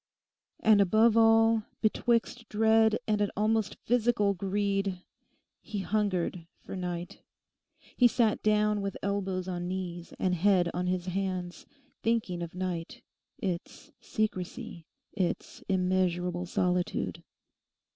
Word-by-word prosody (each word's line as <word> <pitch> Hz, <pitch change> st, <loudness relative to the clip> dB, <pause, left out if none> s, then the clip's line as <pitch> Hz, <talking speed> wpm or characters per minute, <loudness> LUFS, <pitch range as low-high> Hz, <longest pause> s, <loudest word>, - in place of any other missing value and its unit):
And 215 Hz, -2 st, +6 dB
above 220 Hz, +4 st, +4 dB
all, 225 Hz, 0 st, +5 dB, 0.2 s
betwixt 230 Hz, +1 st, 0 dB
dread 220 Hz, 0 st, +4 dB
and 210 Hz, -1 st, +1 dB
an 205 Hz, -, +2 dB
almost 215 Hz, 0 st, +1 dB
physical 230 Hz, -4 st, +2 dB
greed, 195 Hz, -1 st, -1 dB, 0.6 s
he 210 Hz, -, -6 dB
hungered 190 Hz, -5 st, -1 dB
for -, -, -9 dB
night. 175 Hz, -1 st, -5 dB, 0.8 s
He 245 Hz, -, +6 dB
sat 230 Hz, -3 st, +1 dB
down 210 Hz, -1 st, +2 dB
with 200 Hz, -1 st, -3 dB
elbows 190 Hz, -2 st, -2 dB
on 175 Hz, -1 st, -3 dB
knees 180 Hz, -2 st, -5 dB
and 185 Hz, -, +1 dB
head 180 Hz, -1 st, +3 dB
on 180 Hz, +1 st, -2 dB
his 180 Hz, -1 st, -1 dB
hands, 185 Hz, -2 st, -3 dB, 0.3 s
thinking 215 Hz, -6 st, 0 dB
of 170 Hz, 0 st, -6 dB
night, 180 Hz, -3 st, -4 dB, 0.3 s
its 180 Hz, -5 st, -5 dB
secrecy, 215 Hz, -3 st, -4 dB, 0.3 s
its 185 Hz, -4 st, -3 dB
immeasurable 180 Hz, -1 st, 0 dB
solitude. 180 Hz, 0 st, -1 dB
195 Hz, 115 wpm, -29 LUFS, 180-215 Hz, 0.8 s, And